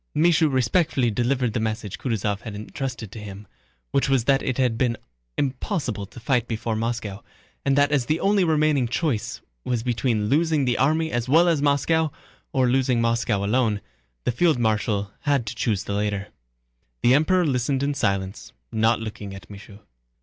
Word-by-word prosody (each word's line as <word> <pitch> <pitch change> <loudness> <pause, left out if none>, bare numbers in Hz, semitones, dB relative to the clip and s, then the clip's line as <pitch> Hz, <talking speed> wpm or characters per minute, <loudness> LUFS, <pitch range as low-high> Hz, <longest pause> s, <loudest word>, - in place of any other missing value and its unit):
Michaud 165 0 +4
respectfully 130 -1 +2
delivered 125 +1 0
the - - 0
message 110 -2 -3
Kutúzov 105 -5 -1
had 110 -1 -8
entrusted 120 0 -5
to 110 - -8
him, 105 0 -9 0.5
which 135 - +1
was 135 -4 +3
that 135 +2 +3
it 130 - -2
had 125 -3 +2
been 115 -1 0 0.4
impossible 130 - -2
to 120 - -12
fight 120 -1 0
before 115 0 -2
Moscow, 110 -3 -3 0.4
and 140 0 +2
that 145 0 +4
as 135 -5 +1
the 155 +2 +1
only 200 -1 +3
remaining 155 -5 +2
choice 125 -3 -2 0.2
was 120 -3 -1
between 115 -3 0
losing 155 +2 +2
the 125 -1 0
army 160 +4 +2
as 120 +1 -2
well 165 +5 +5
as 165 -4 +2
Moscow, 150 +3 +2 0.4
or 130 -2 +2
losing 125 -1 +2
Moscow 115 -3 +1
alone, 110 -1 +1 0.4
the - - +1
field 160 +4 +2
marshal 105 -3 0
had 140 -5 +1
to 115 - -4
choose 110 -3 -1
the 100 - -4
latter. 105 -1 -2 0.7
The 120 - +6
Emperor 175 +5 +3
listened 135 -1 0
in 145 +1 +1
silence, 100 -7 -2 0.2
not 110 +1 +2
looking 105 -3 -6
at 95 0 -12
Michaud. 100 +1 -12
120 Hz, 170 wpm, -24 LUFS, 110-140 Hz, 0.7 s, The